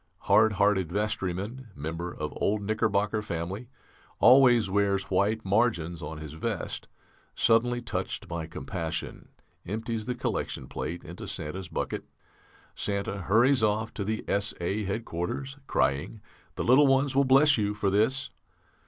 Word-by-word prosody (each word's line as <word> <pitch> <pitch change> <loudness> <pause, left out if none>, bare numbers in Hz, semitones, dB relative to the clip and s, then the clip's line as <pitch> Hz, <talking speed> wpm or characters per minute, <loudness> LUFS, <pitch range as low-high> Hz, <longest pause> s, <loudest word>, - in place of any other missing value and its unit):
Hard 110 0 +4
hearted 100 -4 +2
vestryman, 105 +4 -2
member 80 +4 -4
of 75 -2 -5
old 105 0 0
Knickerbocker 105 0 +1
family, 95 +4 -4 0.5
always 125 -4 +6
wears 100 0 0
white 100 +4 +1
margins 95 -6 +1
on 75 +1 -6
his 75 -1 -8
vest, 80 - -4 0.5
suddenly 120 +1 +2
touched - - -4
by 85 -2 -4
compassion, 80 +3 -5 0.3
empties 110 +3 -4
the 125 - -1
collection - - -3
plate 85 +2 -5
into 90 +5 -8
Santa's 90 0 -4
bucket. 85 - -3 0.7
Santa 100 0 -2
hurries 115 +7 +3
off 110 +1 +1
to 100 - -3
the 110 +2 -3
S.A. 100 0 -1
headquarters 110 +6 -3
crying 70 +10 0 0.4
'The - - -2
little 135 +4 +6
ones 135 0 +2
will 140 - +5
bless 140 +2 +5
you 105 0 0
for 100 -2 0
this.' 130 +7 +1
105 Hz, 135 wpm, -28 LUFS, 90-115 Hz, 0.7 s, always